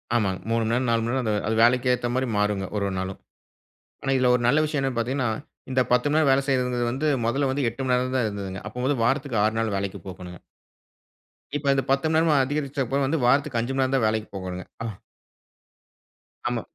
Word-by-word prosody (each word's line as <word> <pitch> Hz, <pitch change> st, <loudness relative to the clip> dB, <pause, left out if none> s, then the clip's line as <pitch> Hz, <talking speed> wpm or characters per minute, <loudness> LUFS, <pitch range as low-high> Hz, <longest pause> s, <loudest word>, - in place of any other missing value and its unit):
ஆமாங்க, 95 Hz, -5 st, +1 dB
3 115 Hz, 0 st, +1 dB
மணி 110 Hz, -, -1 dB
நேரம், 125 Hz, +1 st, +1 dB
4 115 Hz, 0 st, +2 dB
மணி 115 Hz, -, -1 dB
நேரம் 130 Hz, -1 st, 0 dB
அந்த 110 Hz, -, +1 dB, 0.2 s
அது 110 Hz, -, +1 dB
வேலைக்கு 125 Hz, +2 st, +4 dB
ஏற்ற 120 Hz, -, -1 dB
மாரி 130 Hz, 0 st, 0 dB
மாறுங்க, 105 Hz, -2 st, 0 dB
ஒரு 100 Hz, -, 0 dB
ஒரு 95 Hz, -, -3 dB
நாளும். 95 Hz, +1 st, -5 dB, 0.8 s
ஆனா 135 Hz, -, 0 dB
இதில 125 Hz, -1 st, +3 dB
ஒரு 120 Hz, -, +1 dB
நல்ல 140 Hz, +5 st, +4 dB
விஷயம் 150 Hz, -2 st, -1 dB
என்னான்னு 135 Hz, -3 st, -1 dB
பாத்தீங்கன்னா, 130 Hz, +1 st, 0 dB, 0.4 s
இந்த 130 Hz, 0 st, +2 dB
10 125 Hz, +3 st, +3 dB
மணி 150 Hz, -, +2 dB
நேரம் 145 Hz, -4 st, +4 dB
வேலை 135 Hz, +1 st, +3 dB
செய்வதுங்றது 125 Hz, -2 st, +1 dB
வந்து, 145 Hz, +5 st, -1 dB, 0.2 s
மொதல்ல 135 Hz, +4 st, +1 dB
வந்து 135 Hz, -1 st, 0 dB
8 125 Hz, +4 st, -6 dB
மணி 125 Hz, -, +2 dB
நேரம் 130 Hz, +1 st, 0 dB
தான் 125 Hz, -3 st, +2 dB
இருந்ததுங்க. 95 Hz, -2 st, -5 dB
அப்போ 125 Hz, +1 st, -5 dB
வந்து 140 Hz, -2 st, +1 dB
வாரத்துக்கு 135 Hz, -3 st, +1 dB
6 110 Hz, +1 st, +1 dB
நாள் 110 Hz, -3 st, 0 dB
வேலைக்கு 100 Hz, 0 st, -3 dB
போகனுங்க. 90 Hz, -2 st, -9 dB, 1.2 s
இப்ப 145 Hz, -1 st, -5 dB
இந்த 135 Hz, -2 st, +1 dB
10 135 Hz, +3 st, +2 dB
மணி 160 Hz, -, +1 dB
நேரமா 160 Hz, -2 st, +3 dB
அதிகரிச்சப்ப 140 Hz, -2 st, -1 dB
வந்து, 160 Hz, +4 st, 0 dB
வாரத்துக்கு 135 Hz, -1 st, +2 dB
5 120 Hz, +3 st, -3 dB
மணி 135 Hz, 0 st, +2 dB
நேரம் 130 Hz, +1 st, +1 dB
தான் 115 Hz, -, +2 dB
வேலைக்கு 110 Hz, 0 st, -1 dB
போகனுங்க. 90 Hz, -1 st, -5 dB, 1.8 s
ஆமா. 120 Hz, -1 st, -2 dB
125 Hz, 210 wpm, -25 LUFS, 110-135 Hz, 1.8 s, வேலைக்கு